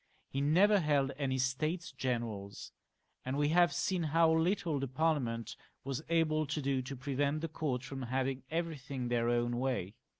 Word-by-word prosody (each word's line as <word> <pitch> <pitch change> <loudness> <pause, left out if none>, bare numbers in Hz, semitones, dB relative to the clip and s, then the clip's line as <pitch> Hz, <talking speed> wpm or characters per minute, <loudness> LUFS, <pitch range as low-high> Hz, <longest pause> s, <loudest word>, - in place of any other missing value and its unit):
He 135 - -1
never 190 +8 +5
held 145 -4 +2
any 135 -2 -1
States 155 +7 -1
Generals, 115 -6 -4 0.5
and 130 +2 -2
we 145 0 +2
have 175 +1 +5
seen 185 -2 0
how 165 +1 +3
little 165 -2 +1
the 135 - -2
Parliament 130 -5 0 0.3
was 135 +1 -3
able 155 -2 +2
to 150 +2 -2
do 135 -2 0
to 135 +2 -6
prevent 140 +3 -1
the 165 - -1
court 145 -5 -2
from 135 0 -6
having 130 +1 -1
everything 145 -6 -3
their 120 -1 +1
own 120 0 +1
way. 125 -8 -1
140 Hz, 165 wpm, -33 LUFS, 130-160 Hz, 0.5 s, never